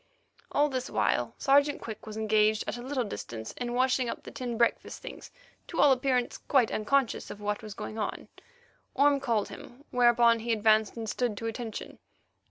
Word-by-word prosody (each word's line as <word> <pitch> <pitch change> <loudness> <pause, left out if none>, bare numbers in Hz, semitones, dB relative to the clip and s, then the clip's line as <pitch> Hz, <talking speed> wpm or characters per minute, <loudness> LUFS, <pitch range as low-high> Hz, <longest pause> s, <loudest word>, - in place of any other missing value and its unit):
All 295 +1 +3
this 260 -3 -3
while - - 0
Sergeant 285 +1 +3
Quick 220 -1 -8
was 215 0 -6
engaged 215 0 +2
at - - -3
a 240 - -7
little 260 0 -1
distance 110 - -6
in 240 -1 -4
washing 255 -1 +2
up - - -5
the - - -9
tin 240 -2 -4
breakfast 235 0 0
things, - - -9 0.4
to 335 - -5
all 285 0 +7
appearance 255 -2 +1
quite 260 -6 +2
unconscious 255 +3 0
of 210 - -8
what 210 +2 -2
was 215 -2 -8
going 220 - -6
on. 210 - -3 0.7
Orme 280 +1 +4
called 230 -6 0
him, 265 +5 -12
whereupon 240 -1 +5
he 230 +1 -1
advanced 220 0 +3
and 225 -1 -4
stood 230 -1 -1
to 225 - -5
attention. 225 0 -5
240 Hz, 180 wpm, -29 LUFS, 220-260 Hz, 0.7 s, all